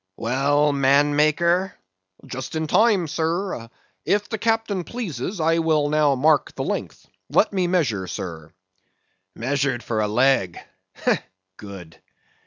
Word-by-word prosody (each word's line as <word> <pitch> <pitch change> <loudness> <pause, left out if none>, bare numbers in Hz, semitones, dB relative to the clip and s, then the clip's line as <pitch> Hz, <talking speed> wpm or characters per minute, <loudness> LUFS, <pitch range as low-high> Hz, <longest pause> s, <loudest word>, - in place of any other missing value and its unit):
_) - - -58
Well, 145 +5 +1
manmaker! 150 +6 +2 0.5
Just 130 +4 -6
in 160 0 -1
time, 200 +1 +3
sir. 160 -4 -2 0.3
If 205 0 0
the 220 - -3
captain 225 -4 0
pleases, 185 - -5
I 165 +1 +2
will 155 -3 +1
now 150 -2 +3
mark 150 +3 +2
the - - -3
length. - - -4 0.2
Let - - +2
me 185 -2 +1
measure, 130 - 0
sir. 80 -3 -7 0.8
Measured 135 0 -1
for 110 -2 -1
a 105 - +1
leg! 110 -5 +2 1.0
good. 95 -5 -11
150 Hz, 125 wpm, -23 LUFS, 125-175 Hz, 1.0 s, time